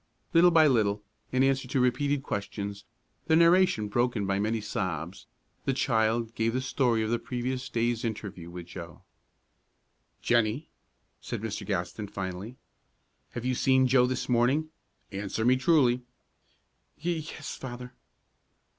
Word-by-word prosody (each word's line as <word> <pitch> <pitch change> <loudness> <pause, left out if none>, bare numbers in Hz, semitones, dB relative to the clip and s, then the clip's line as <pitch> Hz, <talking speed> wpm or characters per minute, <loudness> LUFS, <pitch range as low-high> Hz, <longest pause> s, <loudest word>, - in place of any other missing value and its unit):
Little 175 +1 +7
by 165 -2 +6
little, 105 -7 +2 0.3
in 130 +1 +3
answer 135 -1 +1
to 130 - 0
repeated 140 +3 +1
questions, 100 -2 -4 0.4
the 160 - +4
narration 170 - +4
broken 120 -1 0
by 95 0 0
many 110 +2 0
sobs, 95 -4 -4 0.4
the 135 - +1
child 115 -3 +1
gave 115 -1 0
the 130 - 0
story 120 -4 +1
of 110 - -2
the 120 - +1
previous 125 +1 -3
day's 120 -1 0
interview 100 -6 -5
with 85 0 -8
Joe. 85 -1 -10 1.2
"Jennie," 120 +5 +1 0.5
said - - -5
Mr. 110 -2 -4
Gaston, 100 +1 -3
finally, 95 +5 -6 0.8
"have 120 0 -5
you 130 - +1
seen 130 +1 +3
Joe 125 -1 +4
this 130 - -2
morning? 130 +6 +2 0.4
Answer 100 +2 -3
me 125 +1 +5
truly." 130 -4 +3 1.0
"Ye 170 +2 -1
yes, 155 -1 -7
Father." 125 -1 -8
120 Hz, 135 wpm, -28 LUFS, 105-130 Hz, 1.2 s, Little